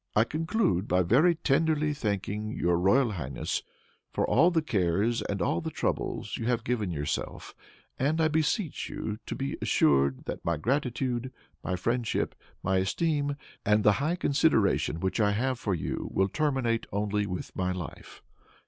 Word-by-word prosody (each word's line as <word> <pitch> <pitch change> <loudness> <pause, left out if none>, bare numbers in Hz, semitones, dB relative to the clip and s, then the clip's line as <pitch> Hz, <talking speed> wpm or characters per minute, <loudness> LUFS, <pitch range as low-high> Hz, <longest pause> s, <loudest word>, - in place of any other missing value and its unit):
"I 110 - +6
conclude 160 - 0
by 90 +1 +3
very 145 - +4
tenderly 155 0 +1
thanking 105 -4 -2
your 85 0 +2
royal 115 +7 +3
highness 70 -9 -3 0.5
for - - 0
all 165 +7 +5
the 165 -3 +1
cares 100 - +1
and 100 -3 -2
all 85 - 0
the - - -3
troubles - - -2
you 115 - -3
have 120 -2 +1
given 110 -5 -1
yourself; 75 -4 -4 0.5
and 150 +5 +1
I 160 - +4
beseech 160 - 0
you 105 0 -4
to - - -3
be 135 +1 -3
assured 70 -1 +2
that - - -5
my 85 -1 0
gratitude, 125 - -1 0.3
my 90 - -1
friendship, 115 +5 -1 0.3
my 95 0 +2
esteem, 145 - 0 0.3
and 105 0 +3
the 105 - +6
high 160 +4 +1
consideration 135 - +2
which 95 +4 -1
I 105 -1 +3
have 130 +3 0
for 100 -5 0
you, 75 - -3
will 95 0 +2
terminate 135 -5 0
only 105 0 0
with 90 -1 -5
my 90 0 0
life. 90 -3 -8
115 Hz, 160 wpm, -28 LUFS, 95-145 Hz, 0.5 s, I